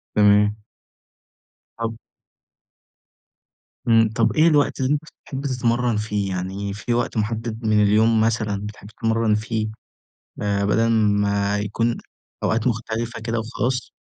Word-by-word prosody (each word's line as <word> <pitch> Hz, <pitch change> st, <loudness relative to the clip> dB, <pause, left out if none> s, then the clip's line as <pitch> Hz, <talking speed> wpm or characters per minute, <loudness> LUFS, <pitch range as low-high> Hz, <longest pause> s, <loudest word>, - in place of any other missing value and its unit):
تمام. 105 Hz, 0 st, +5 dB, 1.2 s
طَب 115 Hz, 0 st, -4 dB, 1.9 s
إمم. 115 Hz, -1 st, +5 dB
طَب 115 Hz, -1 st, +2 dB
إيه 155 Hz, +2 st, +5 dB
الوقت 145 Hz, -3 st, +2 dB
اللي 130 Hz, +1 st, +1 dB
أنت 150 Hz, -, 0 dB, 0.2 s
بتحب 135 Hz, -1 st, -6 dB
تتمرَّن 120 Hz, -3 st, +1 dB
فيه؟ 105 Hz, -2 st, -2 dB
يعني 95 Hz, +2 st, -3 dB
في 115 Hz, +3 st, -3 dB
وقت 120 Hz, -1 st, -1 dB
مُحدِّد 110 Hz, +1 st, -2 dB
من 105 Hz, -1 st, +3 dB
اليوم 110 Hz, +2 st, +4 dB
مثلًا 110 Hz, -3 st, 0 dB
بتحب 105 Hz, -1 st, -11 dB
تتمرَّن 115 Hz, 0 st, 0 dB
فيه، 110 Hz, 0 st, -2 dB, 0.7 s
آآ 100 Hz, -1 st, 0 dB
بَدَل 115 Hz, +3 st, +2 dB
ما 105 Hz, -2 st, +2 dB
يكون 115 Hz, +3 st, -1 dB, 0.5 s
أوقات 115 Hz, +2 st, +1 dB
مختلفة 115 Hz, 0 st, -2 dB
كده 115 Hz, 0 st, -2 dB
وخلاص؟ 120 Hz, +2 st, -2 dB
110 Hz, 125 wpm, -22 LUFS, 105-115 Hz, 1.9 s, تمام